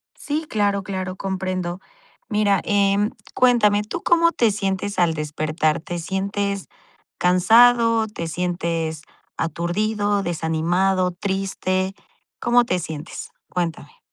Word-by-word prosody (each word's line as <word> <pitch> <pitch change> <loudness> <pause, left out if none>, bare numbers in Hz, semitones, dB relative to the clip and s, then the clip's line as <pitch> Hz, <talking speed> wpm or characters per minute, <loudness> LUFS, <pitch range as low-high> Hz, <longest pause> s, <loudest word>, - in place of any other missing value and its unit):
Sí, 305 +2 -3
claro, 200 -2 +1
claro, 185 -1 -4
comprendo. 185 -2 -3 0.5
Mira, 210 -2 +2
em, 205 +1 +2 0.2
cuéntame, 210 -5 +4
¿tú 245 +11 -6
cómo 335 0 +4
te 230 -8 +2
sientes 195 0 -2
al 170 -2 +3
despertar? 155 +1 -1
¿Te 175 +2 -6
sientes 200 +2 -2 0.5
cansado, 225 +5 +5
te 170 -6 -5
sientes 170 -2 -2 0.4
aturdido, 205 +5 -1
desanimado, 175 +3 +1
triste? 190 0 -2 0.5
¿Cómo 240 0 +3
te 180 -5 0
sientes? 155 0 -7 0.2
Cuéntame. 165 -4 -4
190 Hz, 105 wpm, -22 LUFS, 175-210 Hz, 0.5 s, cansado